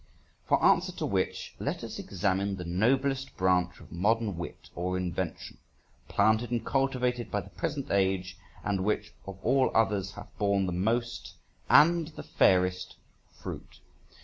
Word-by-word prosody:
For - - +3
answer - - +4
to - - -3
which, - - -2
let - - -3
us - - -6
examine 100 0 -1
the 90 -2 -6
noblest 130 +9 0
branch 90 -1 +1
of 80 - -15
modern 105 +3 +1
wit 85 0 -8
or 90 +1 -2
invention 90 -2 -4 0.5
planted 110 +2 +2
and 120 -2 -2
cultivated 125 -3 0
by 105 - -1
the - - -14
present 150 -5 -3
age, 95 -1 +1 0.3
and 100 -2 0
which 105 +1 -1
of 95 -1 -7
all 130 +2 +3
others 100 -4 +1
hath 105 - -11
borne 100 -2 +2
the 90 - -2
most 115 +6 -1 0.3
and 170 +1 +6
the 155 - -9
fairest 90 0 +2 0.4
fruit. - - -9
100 Hz, 150 wpm, -29 LUFS, 95-120 Hz, 0.5 s, and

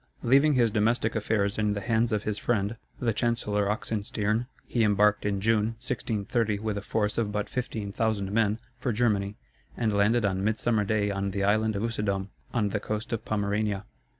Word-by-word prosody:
Leaving 140 +5 +5
his 120 -4 +3
domestic 110 +2 +1
affairs 105 -1 0
in 105 -1 +2
the 100 - -2
hands 115 +3 +1
of 105 -1 0
his 105 -1 -2
friend, 105 -2 0 0.2
the 115 -3 +1
Chancellor 105 -3 0
Oxenstiern, 105 +1 -1 0.2
he 120 - +1
embarked 105 0 +3
in 100 -1 0
June, 110 +1 +1
1630, 110 -2 -1
with 105 0 -2
a 100 - -3
force 105 +1 -1
of 110 -3 0
but 105 0 -2
fifteen 110 -5 -3
thousand 100 -2 -1
men, 110 -1 +2 0.2
for 125 -1 -1
Germany, 105 -3 +1 0.4
and 110 -3 +1
landed 105 +3 +3
on 95 -1 0
midsummer 110 +1 +1
day 105 0 +1
on 100 0 -1
the 100 0 -2
island 110 +2 +2
of 100 - -1
Usedom, 100 -4 -1 0.2
on 105 -4 +1
the 105 - -1
coast 110 +2 -4
of 115 - -2
Pomerania. 105 -1 -1
105 Hz, 180 wpm, -28 LUFS, 100-115 Hz, 0.4 s, Leaving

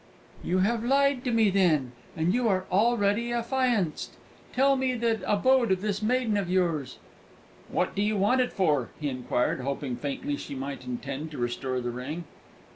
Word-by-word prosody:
"You 180 - 0
have 230 +1 0
lied 275 +1 +2
to 250 - +1
me, 225 -3 +3
then, 160 -10 +2 0.3
and 165 +3 +1
you 245 0 +1
are 185 -2 +1
already 220 +2 +2
affianced! 235 - 0 0.4
Tell 275 +1 +3
me 260 -1 0
the 230 -2 0
abode 240 +2 +3
of 185 -1 +1
this 205 0 -2
maiden 230 -1 +1
of 195 -3 -2
yours." 165 -8 0 0.7
"What - - 0
do 200 - -1
you 210 0 +1
want 210 +7 +3
it 250 - 0
for?" 150 - +1
he 150 -2 -1
inquired, 125 -1 -1
hoping 135 -1 -3
faintly 145 - -3
she 140 - -7
might 135 -1 -5
intend 140 +5 -4
to 150 - -9
restore 125 +1 -2
the 120 0 -3
ring. 135 +8 -5
195 Hz, 175 wpm, -27 LUFS, 140-235 Hz, 0.7 s, me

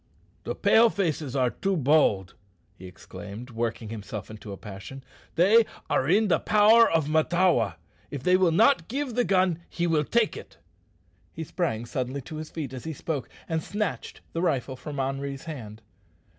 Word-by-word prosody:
"The - - -3
Pale 230 +1 +5
faces 155 - -2
are 125 -2 +2
too 195 -1 -1
bold," 130 - +3 0.4
he 95 -1 -12
exclaimed, 100 +6 -10
working 115 -1 -3
himself 105 -1 -7
into 110 -1 -9
a 100 - -6
passion. 105 +7 -9 0.3
"They 205 +7 +6 0.3
are 135 - +1
in 210 +4 +4
the 165 -5 +3
power 220 +2 +5
of 160 -3 +1
Mahtawa. 155 - +2 0.3
If 140 -3 -6
they 180 +3 +4
will 185 -2 +4
not 215 0 +4
give 270 +1 -3
the 245 - +2
gun 185 -5 +2
he 175 - -2
will 160 -3 +2
take 235 +6 +1
it." - - -11 0.8
He 160 - -5
sprang 145 -9 -2
suddenly 130 +3 -3
to 155 +3 -8
his 155 0 -6
feet 145 -6 -5
as 130 - -8
he 160 - -3
spoke, 145 -2 -4 0.2
and 160 -1 -1
snatched 210 +4 -4
the 165 - -1
rifle 140 -6 0
from 140 +3 -8
Henri's 135 +1 -3
hand. 110 -9 -8
150 Hz, 170 wpm, -26 LUFS, 120-180 Hz, 0.8 s, They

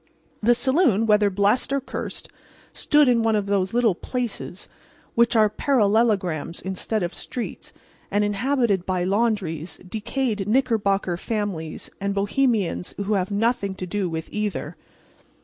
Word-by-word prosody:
The 240 +3 +4
saloon 260 - +3
(whether 210 -1 +4
blessed 200 +7 +1
or 275 - +2
cursed) 270 - -6 0.5
stood 295 -1 +3
in 240 -2 +4
one 225 -1 +2
of 205 -2 0
those 200 -2 0
little 235 -3 +3
"places" 230 -2 -4 0.5
which 235 +1 +3
are 215 -1 +6
parallelograms 205 - +1
instead 190 +2 -3
of 175 - -3
streets, 245 - -6 0.4
and 205 +1 +1
inhabited 205 -2 +1
by 185 -1 0
laundries, 190 -5 -1
decayed 215 0 -2
Knickerbocker 210 -7 +1
families 195 -7 -4
and 200 0 -1
Bohemians 205 -3 0
who 205 +1 -1
have 185 -2 0
nothing 205 -2 0
to 185 - -5
do 190 0 -2
with 160 0 -4
either. 210 -2 -3
205 Hz, 135 wpm, -24 LUFS, 190-235 Hz, 0.5 s, are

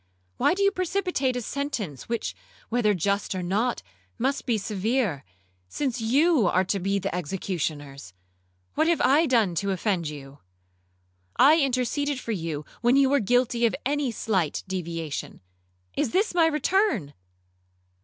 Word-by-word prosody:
Why - - +3
do 400 - 0
you 395 - +4
precipitate 360 -8 -1
a 245 - -3
sentence 225 - -4
which, 235 -1 -2 0.3
whether 225 -3 +2
just 200 +3 -1
or 185 - -3
not, 210 - 0 0.3
must 270 +3 -1
be 235 -3 +2
severe, 210 - -1 0.5
since 255 - -2
you 270 - +3
are 185 +1 +3
to 195 +1 -1
be 195 +2 0
the 195 - -3
executioners? 150 - -4 0.6
What 315 - +2
have 340 -1 +2
I 300 +5 +4
done 225 -8 +3
to 200 +4 -1
offend 190 -3 0
you? 140 -1 -10 1.0
I 305 +4 +6
interceded 270 +2 0
for 230 - -5
you 160 -7 -3 0.2
when 240 +2 +4
you 275 -1 +4
were 285 - +4
guilty 240 +1 +2
of 225 - -2
any 285 -1 0
slight 195 -8 -1
deviation—Is 95 - -5
this 395 - +1
my 335 -2 +4
return?' 300 - +1
225 Hz, 145 wpm, -26 LUFS, 175-275 Hz, 1.0 s, I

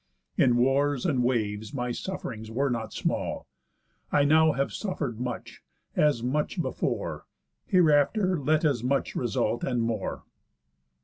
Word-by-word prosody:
In 120 -2 +4
wars 135 +2 +2
and 130 -5 +2
waves 110 -1 -1
my 125 -2 -2
suff'rings 120 - -5
were 135 +4 0
not 115 -2 -3
small. - - -2 0.7
I 145 - +4
now 155 +2 +5
have 140 +1 -1
suffer'd 145 - -3
much, 125 -1 -5 0.3
as 150 -6 +2
much 150 +5 -1
before, - - -2 0.4
Hereafter 180 +2 +3
let 155 +3 +2
as 135 -6 +1
much 135 +2 0
result, 120 -1 0
and 125 -2 0
more." 115 -4 -3
135 Hz, 130 wpm, -27 LUFS, 120-150 Hz, 0.7 s, now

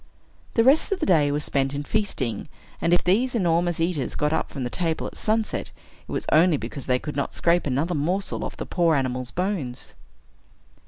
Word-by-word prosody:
The 230 - +5
rest 275 +10 +4
of 395 - 0
the - - 0
day 150 -6 +4
was 145 +1 -1
spent 135 0 0
in 145 - -3
feasting; 145 - -2 0.3
and 170 - +1
if 175 - +3
these 240 +8 +2
enormous 175 -4 +1
eaters 165 -6 -1
got 150 +1 +1
up - - -1
from 130 -3 -4
table 165 +5 -2
at - - -6
sunset, 220 0 -1 0.4
it - - -10
was - - -2
only 160 0 +5
because 125 +2 -7
they 125 -1 +3
could 150 +3 -6
not 140 - -2
scrape 170 -1 +2
another 145 +7 0
morsel 175 +6 -1
off - - -6
the - - -4
poor 170 -3 +2
animal's 130 -2 -1
bones. 180 -10 -3
165 Hz, 195 wpm, -24 LUFS, 140-185 Hz, 0.4 s, The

